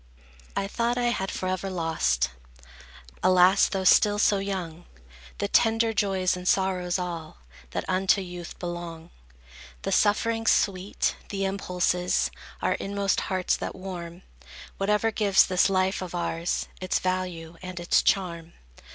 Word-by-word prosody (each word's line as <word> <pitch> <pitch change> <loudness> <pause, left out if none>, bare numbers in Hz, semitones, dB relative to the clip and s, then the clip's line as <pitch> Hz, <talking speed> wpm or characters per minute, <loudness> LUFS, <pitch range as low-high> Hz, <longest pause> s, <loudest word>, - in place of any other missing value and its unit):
I 195 - -1
thought 235 +3 -1
I 240 -1 +2
had 190 -4 -2
forever 185 +1 -3
lost, 160 - 0 0.9
Alas, 185 +1 +5
though 190 -1 -2
still 205 +2 +5
so 205 -1 +3
young, 180 -4 -4 0.5
The - - -1
tender 225 0 +3
joys 195 -4 +1
and 180 0 -6
sorrows 185 -2 +1
all, 170 -3 -5 0.3
That - - -4
unto 190 +2 +2
youth 175 -2 -7
belong; 175 -2 -6 0.7
The 195 - -2
sufferings 225 +3 +2
sweet, 195 0 +1
the 195 -1 -2
impulses 180 -2 0 0.3
Our - - +2
inmost 200 0 -1
hearts 185 -1 +1
that - - -5
warm; 180 -2 -7 0.6
Whatever 210 +3 +2
gives 205 -3 +4
this 185 +1 +2
life 190 0 +1
of 180 -1 -6
ours 170 0 -2
Its 185 - 0
value 180 -3 -3
and 185 -1 -7
its 175 - +3
charm. 170 -4 0
185 Hz, 135 wpm, -26 LUFS, 175-195 Hz, 0.9 s, Alas